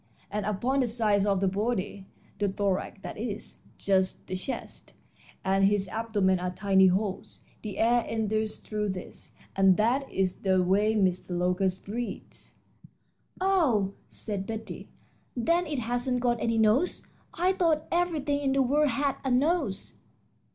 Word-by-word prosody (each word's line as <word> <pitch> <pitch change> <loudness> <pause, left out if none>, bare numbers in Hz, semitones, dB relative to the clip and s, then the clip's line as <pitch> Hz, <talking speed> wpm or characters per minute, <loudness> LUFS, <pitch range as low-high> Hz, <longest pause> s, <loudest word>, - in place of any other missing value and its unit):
And 210 0 -2
upon 240 +7 0
the 255 - +2
sides 210 -3 +2
of 195 -2 +2
the 195 - +2
body 200 -1 -2 0.3
(the 205 - +2
thorax 195 0 -1
that - - -7
is, 225 -2 -5 0.2
just 190 -1 0
the 185 - -4
chest) 185 +8 -7 0.5
and 195 +1 +2
his 200 -1 +2
abdomen 205 -5 +1
are 180 0 -2
tiny 190 +1 +4
holes. 195 +1 -2 0.2
The 210 -3 -6
air 235 +1 +3
enters 220 -1 -1
through 210 -1 -3
these, 185 - -10 0.2
and 190 -1 +5
that 250 +6 +1
is 190 -1 0
the 190 -2 +2
way 205 +4 +2
Mr. 185 -3 0
Locust 180 +1 0
breathes." 235 +4 -6 0.8
"Oh," 295 - +2 0.2
said 200 -3 -2
Betty, 220 -1 -6 0.5
"then 335 +9 +2
it 300 -2 -3
hasn't 245 +1 -1
got 240 -1 0
any 230 -1 +1
nose? 225 +10 +2 0.3
I 365 +3 +2
thought 330 -5 +1
everything 315 -5 0
in 275 -2 0
the 270 0 +3
world 290 +3 +2
had 275 +2 0
a 265 - -1
nose." 270 - 0
215 Hz, 150 wpm, -28 LUFS, 195-260 Hz, 0.8 s, and